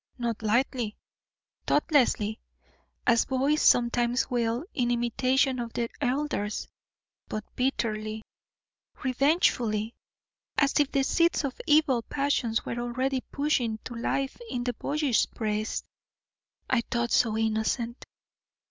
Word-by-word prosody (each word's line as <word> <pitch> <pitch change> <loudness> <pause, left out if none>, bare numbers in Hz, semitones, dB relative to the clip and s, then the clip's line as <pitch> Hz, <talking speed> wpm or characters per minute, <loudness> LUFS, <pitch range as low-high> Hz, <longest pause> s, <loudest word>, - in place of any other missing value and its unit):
Not 235 -3 -2
lightly, 230 0 0 0.7
thoughtlessly, 250 -8 +2 0.7
as 235 -2 +4
boys 275 +4 +1
sometimes 240 +1 +3
will 235 +3 0
in 245 -5 0
imitation 255 +2 +1
of 235 -1 -4
their 235 -1 -1
elders, 255 -6 -1 0.6
but 215 0 -4
bitterly, 220 -4 -1 0.8
revengefully, 245 -5 +2 0.6
as 280 -1 +3
if 290 -2 +2
the 275 - +2
seeds 335 +3 +2
of 275 -2 -4
evil 295 -5 +4
passions 265 -4 0
were 235 - -3
already 255 +2 -1
pushing 260 -6 0
to 245 - -7
life 265 - -2
in 245 - -2
the 245 0 -1
boyish 285 0 +1
breast 215 -1 -2 0.8
I 255 -2 +2
thought 235 0 0
so 220 -3 +3
innocent. 225 +2 -1
245 Hz, 110 wpm, -28 LUFS, 230-270 Hz, 0.8 s, as